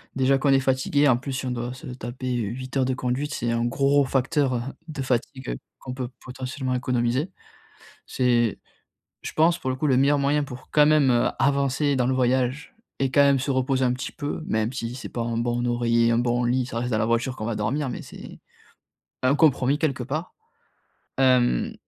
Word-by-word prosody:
déjà 135 +1 +3
qu'on 140 - +1
est 135 - +5
fatigué, 135 +2 +2
en 130 - +5
plus 135 +2 -6
si 130 - -3
on 125 - -2
doit 120 0 -3
se 135 - -12
taper 125 0 -6
8 125 +5 -5
heures 130 - +2
de 130 - 0
conduite, 130 +4 -2
c'est 120 0 -1
un 115 0 0
gros 140 +3 +3
facteur, 135 +1 +1
heu, 120 - -1 0.3
de 150 -3 -5
fatigue 130 - -2 0.2
qu'on 125 - -7
peut 130 -2 -4
potentiellement 130 0 -4
économiser. 125 +6 0 0.8
C'est 120 -3 +1 0.6
je - - -6
pense, 165 +2 +3
pour 130 - -4
le 130 - -1
coup, 150 - -1
le 130 -3 +3
meilleur 140 +2 +3
moyen 145 +2 +2
pour 130 -2 -10
quand 150 -1 +5
même, 150 -3 +4
heu, 120 -1 +3
avancer 140 +1 +1
dans 125 -1 +1
le 130 - +1
voyage 130 +2 0 0.3
et 135 -1 +1
quand 145 - +3
même 140 -1 +4
se 130 +2 -2
reposer 130 0 +1
un 125 - +2
petit 125 - -5
peu 145 +2 -4
même 110 +2 0
si 115 -2 -4
c'est 130 - -7
pas 120 - -4
un 115 0 -2
bon 120 +1 -1
oreiller, 115 -1 +2
un 115 - +2
bon 120 0 +1
lit, 125 +1 +1
ça 115 -2 -4
reste 120 +1 -2
dans 110 - +1
la 110 - +1
voiture 120 +3 0
qu'on 110 - -5
va 115 - -1
dormir, 130 +7 -1
mais - - -5
c'est - - -11 0.8
un 130 +2 +3
compromis, 140 -2 +3
quelque 140 -5 -1
part, 150 +7 -4 0.9
hem, 125 - +3
130 Hz, 210 wpm, -24 LUFS, 120-140 Hz, 0.9 s, est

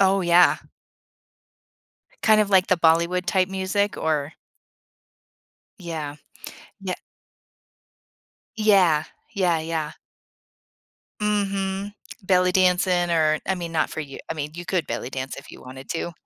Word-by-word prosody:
Oh, 195 0 +4
yeah. 175 0 +5 1.7
Kind 215 -1 +5
of 205 - -1
like 190 -2 +4
the 185 - +3
Bollywood 170 +2 +2
type 185 -1 +2
music 195 +2 -1
or 150 -1 -1 1.5
Yeah. 155 -4 -5 0.7
Ye 185 -2 -3 1.6
Yeah. 190 -8 +4 0.3
Yeah, 180 -5 +1
yeah. 160 -1 -3 1.3
Mhm. 200 -1 -1 0.3
Belly 185 -1 +3
dancing 180 -1 +2
or 155 -2 +2
I 190 - +2
mean, 170 -2 -5
not 160 -1 0
for - - -6
you 140 -3 -7
I - - -1
mean, 150 -1 -5
you 175 0 -7
could 180 -5 -1
belly 125 - -4
dance 135 0 -5
if 140 - -11
you - - -12
wanted 130 +1 -11
to, 170 +1 -3
180 Hz, 125 wpm, -24 LUFS, 160-190 Hz, 1.7 s, yeah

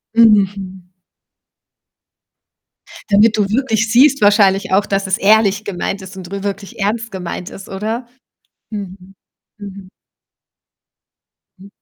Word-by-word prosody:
Mhm. 195 -4 +2 2.3
Damit 210 +2 +4
du 205 - +1
wirklich 225 -2 0
siehst 275 +3 +4
wahrscheinlich 200 -2 +3
auch, 200 +2 +3
dass 195 0 -2
es 190 - 0
ehrlich 210 0 +3
gemeint 195 0 -4
ist 190 +1 -11
und 185 0 -10
rü 200 0 -5
wirklich 200 +1 -6
ernst 225 +3 -2
gemeint 180 -1 -6
ist, 195 - -11
oder? 220 +5 -4 0.6
Mhm, 195 -2 -8 0.4
mhm. 200 -2 -10 1.7
Hm. 195 - -14
200 Hz, 110 wpm, -17 LUFS, 195-220 Hz, 2.3 s, Damit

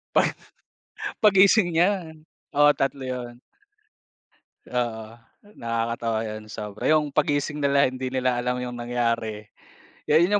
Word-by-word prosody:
Pag - - 0 0.8
gising 195 -1 +5
niya 175 -1 +1 0.4
oo 145 0 +5
3 135 0 -1
yun. 125 -1 -6 1.3
Oo, 115 -3 -2 0.5
nakakatawa 115 -1 -1
yun 110 0 -6
sobra 105 +3 -5
yung 155 -2 +3
paggising 145 0 0
nila 140 -1 +3
hindi 130 0 -1
nila 130 -1 0
alam 125 0 -1
yung 125 -1 -6
nangyari 115 -3 -1 0.7
yun 170 +6 +4
125 Hz, 110 wpm, -25 LUFS, 115-145 Hz, 1.3 s, gising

